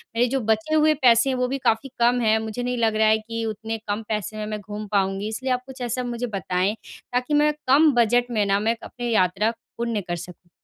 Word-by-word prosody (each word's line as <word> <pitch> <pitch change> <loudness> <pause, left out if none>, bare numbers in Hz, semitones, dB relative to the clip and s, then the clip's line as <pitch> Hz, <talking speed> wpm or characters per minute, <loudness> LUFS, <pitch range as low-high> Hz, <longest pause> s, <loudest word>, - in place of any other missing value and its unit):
मेरे 240 +2 +3
जो - - +2
बचे 220 +8 0
हुए 310 0 +5
पैसे 240 +1 +5
हैं, 260 - 0
वो 250 0 +1
भी 270 +2 -2
काफ़ी 225 +5 +1
कम 240 +1 +3
हैं। 220 -1 +3
मुझे 220 +2 -4
नहीं 250 0 -2
लग 225 -2 +1
रहा 220 0 +3
है 220 0 +5
कि 230 +1 -5
उतने 220 +1 -4
कम 205 +2 -2
पैसे 215 -1 -3
में 215 - -3
मैं 210 0 -4
घूम 210 +1 -7
पाऊँगी 195 0 0
इसलिए 260 +4 -3
आप 250 0 -2
कुछ 265 -1 -10
ऐसा 250 +2 -2
मुझे 240 +1 -3
बताएँ, 185 +3 0 0.4
ताकि 250 +4 0
मैं 300 0 +4
कम 295 +4 +6
बजट 240 +1 +3
में 215 -3 +1
ना, 200 0 +2
मैं 220 +2 +1
एक 230 - -6
अपने 240 -1 -5
यात्रा 205 +1 +2 0.3
पूर्ण 230 -2 -1
कर 175 -2 -4
सकूँ। 175 +1 -11
225 Hz, 245 wpm, -23 LUFS, 210-245 Hz, 0.4 s, कम